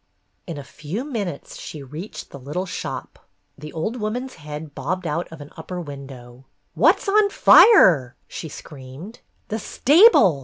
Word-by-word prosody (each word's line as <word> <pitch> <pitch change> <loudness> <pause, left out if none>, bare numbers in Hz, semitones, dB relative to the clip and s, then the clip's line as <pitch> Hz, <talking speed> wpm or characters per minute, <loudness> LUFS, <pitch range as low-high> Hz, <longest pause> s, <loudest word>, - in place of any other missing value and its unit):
In 165 -4 -6
a 145 - -7
few 155 - -6
minutes 210 - -5
she 150 -3 -8
reached 155 +10 -9
the 140 - -10
little 150 +8 -4
shop; 180 - -7 0.3
the 150 +1 -10
old 190 +10 -3
woman's 245 +4 -4
head 150 -1 -9
bobbed 185 +3 -4
out 165 +2 -3
of 165 -2 -10
an 145 - -11
upper 180 -1 -7
window. 135 -5 -10 0.3
"What - - +4
's - - -10
on 410 +1 +4
fire 170 - +6
?" - - -44
she 160 - -7
screamed. 145 - -11 0.3
"The 220 - -3
stable!" 280 - +5
160 Hz, 160 wpm, -22 LUFS, 145-215 Hz, 0.3 s, fire